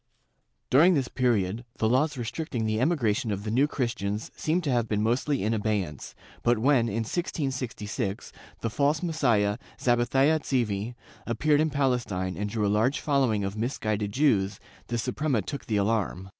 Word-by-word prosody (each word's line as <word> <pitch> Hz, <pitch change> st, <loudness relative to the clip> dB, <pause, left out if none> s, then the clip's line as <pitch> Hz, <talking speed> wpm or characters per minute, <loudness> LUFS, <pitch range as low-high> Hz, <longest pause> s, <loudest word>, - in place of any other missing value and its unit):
During 170 Hz, +7 st, +6 dB
this 135 Hz, -4 st, 0 dB
period, 115 Hz, -4 st, 0 dB
the 110 Hz, -, +1 dB
laws 135 Hz, +5 st, +2 dB
restricting 120 Hz, 0 st, -3 dB
the 110 Hz, +1 st, 0 dB
emigration 130 Hz, -6 st, +1 dB
of 100 Hz, -1 st, -2 dB
the 105 Hz, -, -3 dB
New 135 Hz, +6 st, +3 dB
Christians 110 Hz, -7 st, -3 dB
seem 160 Hz, +3 st, 0 dB
to 150 Hz, -5 st, -1 dB
have 120 Hz, -2 st, +1 dB
been 105 Hz, -1 st, 0 dB
mostly 125 Hz, +3 st, +1 dB
in 110 Hz, +2 st, +1 dB
abeyance, 105 Hz, -9 st, -2 dB, 0.3 s
but 120 Hz, 0 st, +3 dB
when, 125 Hz, 0 st, +3 dB
in 115 Hz, +1 st, -1 dB
1666, 125 Hz, -, -3 dB, 0.3 s
the 115 Hz, -, -2 dB
false 145 Hz, +7 st, +1 dB
Messiah, 120 Hz, -11 st, +1 dB, 0.2 s
Zabathia 135 Hz, +5 st, +3 dB
Tzevi, 120 Hz, -5 st, -1 dB, 0.3 s
appeared 145 Hz, +6 st, +2 dB
in 155 Hz, -, +2 dB
Palestine 125 Hz, -10 st, -1 dB
and 105 Hz, 0 st, -3 dB
drew 105 Hz, 0 st, -1 dB
a -, -, +2 dB
large 115 Hz, +9 st, +2 dB
following 130 Hz, -8 st, +1 dB
of 95 Hz, +1 st, -3 dB
misguided 110 Hz, -3 st, -2 dB
Jews, 100 Hz, -7 st, +2 dB, 0.3 s
the 120 Hz, -, -2 dB
Suprema 130 Hz, -1 st, 0 dB
took 140 Hz, +6 st, -6 dB
the 110 Hz, -, +1 dB
alarm. 100 Hz, -3 st, -1 dB
115 Hz, 160 wpm, -27 LUFS, 105-140 Hz, 0.3 s, During